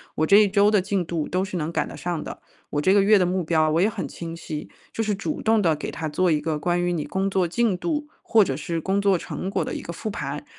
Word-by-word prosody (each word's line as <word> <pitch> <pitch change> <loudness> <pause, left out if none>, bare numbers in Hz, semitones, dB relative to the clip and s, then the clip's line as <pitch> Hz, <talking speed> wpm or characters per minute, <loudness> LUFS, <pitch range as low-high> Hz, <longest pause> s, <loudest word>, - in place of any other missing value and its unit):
我 155 - +1
这 200 +5 +6
一 210 -1 +6
周 200 +1 +4
的 210 - +4
进 190 0 -1
度 165 -2 -3
都 185 +1 0
是 190 -2 -4
能 155 +1 -2
赶 - - -1
得 - - -9
上 175 -3 -3
的， - - -8 0.3
我 145 - -1
这 190 +5 +4
个 205 - +5
月 205 +1 +5
的 185 - +3
目 180 0 0
标 160 -1 +2
我 165 +3 +2
也 205 - +4
很 210 -3 -4
清 165 -1 -7
晰。” 155 -2 -6 0.2
就 225 - -1
是 215 -1 0
主 250 +10 -4
动 225 0 +3
地 165 -4 +2
给 150 - -5
他 160 - -4
做 180 +5 +1
一 150 - +2
个 155 0 -2
关 175 +2 0
于 175 0 0
你 155 - -2
工 190 0 -1
作 190 -2 +1
进 225 +2 +1
度、 295 - -2
或 225 - +4
者 135 -7 -2
是 165 +3 -3
工 195 +4 0
作 195 -2 +3
成 185 - -5
果 - - -1
的 - - -4
一 - - -4
个 - - -7
复 215 +5 -5
盘， 140 -4 -5
180 Hz, 310 characters per minute, -24 LUFS, 160-200 Hz, 0.3 s, 这